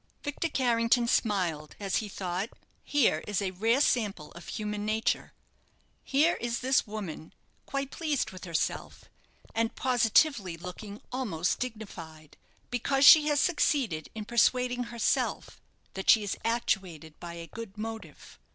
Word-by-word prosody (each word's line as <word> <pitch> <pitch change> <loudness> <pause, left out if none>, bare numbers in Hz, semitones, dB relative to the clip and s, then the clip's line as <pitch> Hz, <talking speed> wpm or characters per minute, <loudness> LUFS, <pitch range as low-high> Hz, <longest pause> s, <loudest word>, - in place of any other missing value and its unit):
Victor 290 +3 -2
Carrington 235 -3 +2
smiled, 180 -10 0
as 195 -2 -1
he 215 - -3
thought, 185 +2 -3 0.3
"Here 240 - +2
is 210 -2 0
a 195 -2 -1
rare 225 +7 +2
sample 205 - 0
of 170 - -12
human 210 -1 -4
nature. 220 +3 0 0.7
Here 300 +5 +2
is 235 0 -2
this 260 -1 +2
woman, 195 -7 -7 0.3
quite 275 0 -3
pleased 305 -5 -1
with 185 0 -9
herself, 170 -2 -3 0.5
and 225 0 0
positively 235 - +2
looking 190 +4 -8
almost 190 -10 -1
dignified, 170 -11 -7 0.4
because 270 +3 +2
she 305 0 +9
has 295 -1 +2
succeeded 280 - +1
in 215 -1 -5
persuading 245 +2 +2
herself 235 -1 -1 0.3
that 190 - -4
she 220 - +7
is 200 - -2
actuated 185 -9 -2
by 170 -1 -7
a 170 0 -7
good 220 +2 -9
motive." 225 +1 -8
220 Hz, 135 wpm, -29 LUFS, 185-250 Hz, 0.7 s, she